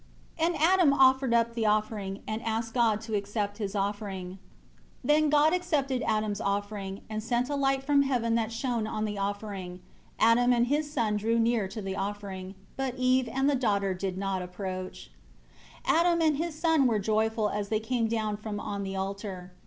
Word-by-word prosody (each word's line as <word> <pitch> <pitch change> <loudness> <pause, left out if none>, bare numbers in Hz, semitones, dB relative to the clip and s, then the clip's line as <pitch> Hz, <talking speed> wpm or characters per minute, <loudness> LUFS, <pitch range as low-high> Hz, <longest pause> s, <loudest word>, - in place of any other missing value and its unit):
2 320 - +3
And 340 0 +1
Adam 335 -1 +4
offered 265 -1 +4
up 235 0 +2
the 225 -2 0
offering, 210 -2 -1
and 215 +1 -3
asked 225 0 -2
God 225 -4 +2
to 225 0 -7
accept 205 +1 -2
his 200 -1 -3
offering. 195 -2 -3 0.6
3 - - -6
Then 300 +1 +4
God 300 +2 +4
accepted 295 -8 0
Adam's 215 -2 0
offering, 200 -1 -3
and 215 0 -4
sent 240 +4 -1
a - - 0
light 270 -1 +1
from 285 0 +4
heaven 245 -4 +1
that 230 -1 0
shown 230 -1 -2
on 215 0 -2
the 205 -1 -4
offering. 195 -3 -4 0.4
Adam 245 +2 +4
and 240 0 +3
his 295 +3 -1
son 215 -7 0
drew 225 +3 +1
near 230 -3 +2
to 205 +2 -7
the 190 0 -3
offering, 195 -1 -5 0.2
but 265 -2 -2
Eve 255 -1 +2
and 270 +2 +1
the 290 - +3
daughter 200 -7 +1
did 185 0 -4
not 195 -1 -2
approach 185 0 -6
it. - - -24
4 - - +4
Adam 340 0 +3
and 310 -3 +3
his 325 0 -3
son 320 -5 +3
were 225 -3 +2
joyful 220 +1 +1
as 205 -1 -3
they 215 0 +1
came 230 +1 0
down 215 -2 -1
from 210 -1 -5
on 205 -1 -4
the 195 0 -4
altar. 190 -1 -5
220 Hz, 195 wpm, -28 LUFS, 200-260 Hz, 0.6 s, Adam